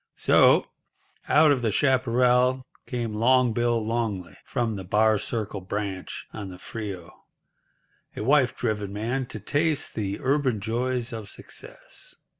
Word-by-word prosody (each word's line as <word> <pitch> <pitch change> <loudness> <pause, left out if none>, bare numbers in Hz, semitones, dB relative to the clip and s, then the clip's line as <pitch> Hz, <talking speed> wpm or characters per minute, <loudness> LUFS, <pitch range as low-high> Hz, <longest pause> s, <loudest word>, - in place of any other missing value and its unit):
So, - - +5 0.6
out 155 0 +6
of 135 -3 +2
the 115 - +1
chaparral 125 0 +2 0.2
came 120 -4 -3
Long 125 +2 +3
Bill 120 -1 +1
Longley 110 -6 -2
from 115 -3 -1
the 95 - -6
Bar 105 +3 +3
Circle 105 -3 -3
Branch 95 0 -5
on 105 -3 -6
the 90 - -9
Frio—a 100 +1 -11
wife 130 0 +3
driven 105 -4 -2
man—to 115 +3 -3
taste 145 - 0
the 100 -2 -3
urban 130 -4 +1
joys 120 +3 -2
of 110 -3 -7
success. - - -10
115 Hz, 125 wpm, -26 LUFS, 105-125 Hz, 0.6 s, out